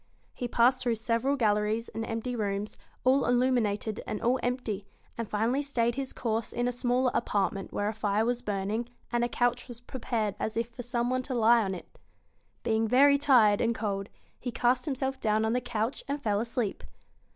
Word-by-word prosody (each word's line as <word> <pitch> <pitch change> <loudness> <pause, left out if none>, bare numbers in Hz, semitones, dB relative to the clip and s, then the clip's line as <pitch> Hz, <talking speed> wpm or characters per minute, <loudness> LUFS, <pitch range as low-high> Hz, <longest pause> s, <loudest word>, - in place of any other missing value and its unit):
He 245 - -4
passed 245 +2 +3
through 240 -2 +1
several 230 +5 0
BEAUTY - - -9
galleries 210 +2 +1
and 225 - -4
empty 225 +2 -3
rooms 205 -1 -2 0.3
all 265 +2 +3
illuminated 240 -4 +1
and 210 - -3
all 250 +2 +2
empty 230 -5 -2 0.3
and 230 -2 -4
finally 230 +6 +1
stayed 240 -5 0
his 270 +1 -4
course 225 -2 -2
in 240 +1 -1
a - - +1
smaller 245 +1 +1
apartment 200 -3 -1
where 205 - -1
a 215 - -1
fire 210 0 0
was 245 0 0
burning, 210 +4 -2 0.2
and 240 -1 +1
a 240 - 0
couch 245 +1 0
was 240 -2 -9
prepared 230 -4 -2
as 220 - -2
if 230 0 -1
for 240 +1 -8
some 245 0 -1
one 255 0 +1
to 255 0 -4
lie 235 0 +5
on 190 -1 -2
it. 175 - -12 0.6
Being 220 0 +1
very 280 +4 +5
tired 230 -8 +5
and 230 0 +1
cold, 200 -2 -3 0.3
he 245 - -4
cast 245 +3 +1
himself 265 -2 -2
down 215 0 +2
on 220 - +1
the 250 - +1
couch 240 0 -2
and 285 +1 -2
fell 210 -6 0
asleep. 230 -2 -2
235 Hz, 195 wpm, -29 LUFS, 215-250 Hz, 0.6 s, lie